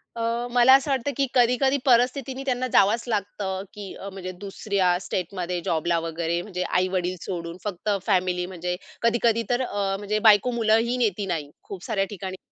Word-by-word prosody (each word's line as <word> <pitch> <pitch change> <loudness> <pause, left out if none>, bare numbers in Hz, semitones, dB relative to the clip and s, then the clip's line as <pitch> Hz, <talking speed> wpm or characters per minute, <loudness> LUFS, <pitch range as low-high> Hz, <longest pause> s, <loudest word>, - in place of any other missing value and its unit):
अ, 230 +1 -1
मला 245 +1 +7
असं 275 +1 +1
वाटतं 270 +1 0
की 275 - +3
कधी-कधी 250 +2 +3
परिस्थितीने 255 +2 +2
त्यांना 255 -1 0
जावंच 215 +4 +4
लागतं, 200 -3 -2
की 210 -2 -8 0.3
म्हणजे 185 -1 -6
दुसऱ्या 200 -1 -1
स्टेटमध्ये 180 -1 -3
जॉबला 170 +1 +1
वगैरे 165 +1 -2
म्हणजे 180 -1 -4
आई-वडील 185 0 0
सोडून 170 -2 -5
फक्त 205 0 -4 0.2
फॅमिली, 180 -3 +1
म्हणजे 180 0 -3 0.3
कधी-कधी 230 0 +2
तर 245 +1 +1
अ, 200 -5 -1
म्हणजे 210 +1 -1
बायको 210 +4 +4
मुलंही 230 +1 +2
नेती 210 -4 0
नाही. 150 -4 -3
खूप 190 -3 -9
साऱ्या 200 -4 0
ठिकाणी 190 -1 -6
205 Hz, 160 wpm, -25 LUFS, 180-240 Hz, 0.3 s, मला